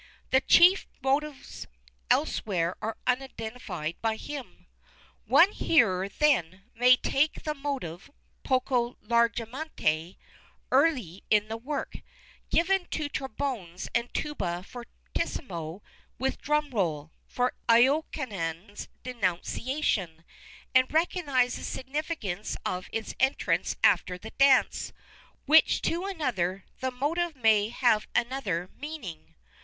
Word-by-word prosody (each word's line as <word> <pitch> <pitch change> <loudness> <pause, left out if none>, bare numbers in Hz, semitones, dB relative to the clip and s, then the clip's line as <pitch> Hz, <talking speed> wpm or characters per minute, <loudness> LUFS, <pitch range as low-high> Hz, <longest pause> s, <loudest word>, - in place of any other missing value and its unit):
The 265 - +5
chief 355 +7 +6 0.2
motives 280 +1 -2 0.4
elsewhere 175 -4 +1
are 220 0 -3
unidentified 245 - -3
by 225 -1 +1
him. 280 +3 -8 0.6
One 370 +4 +6
hearer, 195 - +2
then, 195 - +1
may 250 +2 +6
take 280 +4 0
the 305 - -1
motive, 275 - -5 0.3
poco 250 -2 0
largamente, 235 - 0 0.5
early 235 - +2
in 210 0 +3
the 225 - -3
work, 280 +5 -4 0.5
given 365 +2 +2
to 300 -2 -3
trombones 245 -10 -4
and 235 +1 0
tuba 180 -12 -3
fortissimo 190 - -6 0.3
with 265 +1 -2
drum 300 -1 0
roll, 160 - -1 0.2
for 250 0 0 0.2
Iokanaan's 230 - +1
denunciation, 200 - -2 0.5
and 255 0 +4
recognize 300 -6 +1
the - - -9
significance 265 - -4
of 180 0 -3
its 225 -1 -4
entrance 265 +1 +1
after 180 - +3
the 220 +5 -10
dance, 275 -1 +3 0.5
while 315 +2 +8
to 340 +3 -1
another 195 - -2
the 260 - -1
motive 310 +6 -1
may 220 -4 +3
have 230 -3 +2
another 235 -9 -1
meaning. 195 - -8
245 Hz, 105 wpm, -28 LUFS, 190-285 Hz, 0.6 s, while